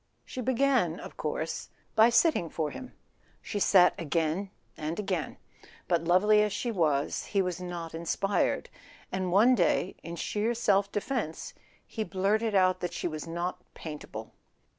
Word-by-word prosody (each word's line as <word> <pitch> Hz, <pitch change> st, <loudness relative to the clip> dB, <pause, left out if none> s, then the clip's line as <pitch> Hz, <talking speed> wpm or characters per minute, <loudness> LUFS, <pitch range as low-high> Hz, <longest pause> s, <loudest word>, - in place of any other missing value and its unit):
She 255 Hz, -, -6 dB
began, 250 Hz, -8 st, +2 dB
of -, -, -9 dB
course, -, -, -3 dB, 0.3 s
by 225 Hz, +1 st, +7 dB
sitting 240 Hz, -, +3 dB
for 155 Hz, -2 st, -2 dB
him. 255 Hz, -, -9 dB, 0.4 s
She 205 Hz, -, -4 dB
sat 190 Hz, -2 st, +6 dB
again 165 Hz, +4 st, -1 dB, 0.3 s
and 155 Hz, +2 st, -4 dB
again; 205 Hz, -, -2 dB, 0.5 s
but, 170 Hz, -2 st, +1 dB
lovely 210 Hz, +5 st, +5 dB
as 210 Hz, 0 st, +1 dB
she 240 Hz, +4 st, -2 dB
was, 150 Hz, -8 st, 0 dB
he 200 Hz, -, +1 dB
was 180 Hz, -1 st, -3 dB
not 175 Hz, -2 st, -5 dB
inspired, 170 Hz, +4 st, 0 dB, 0.4 s
and 185 Hz, -1 st, -2 dB
one 220 Hz, +7 st, +6 dB
day, 185 Hz, -3 st, +1 dB
in 170 Hz, +1 st, -7 dB
sheer 215 Hz, +6 st, -1 dB
self 200 Hz, -3 st, +2 dB
defence, 205 Hz, -, -3 dB, 0.3 s
he 220 Hz, -, -4 dB
blurted 210 Hz, +3 st, 0 dB
out 185 Hz, -1 st, +4 dB
that 175 Hz, -1 st, -3 dB
she -, -, -2 dB
was 155 Hz, -1 st, -5 dB
not 175 Hz, +2 st, -3 dB
paintable. 145 Hz, -8 st, -8 dB
185 Hz, 150 wpm, -29 LUFS, 170-215 Hz, 0.5 s, by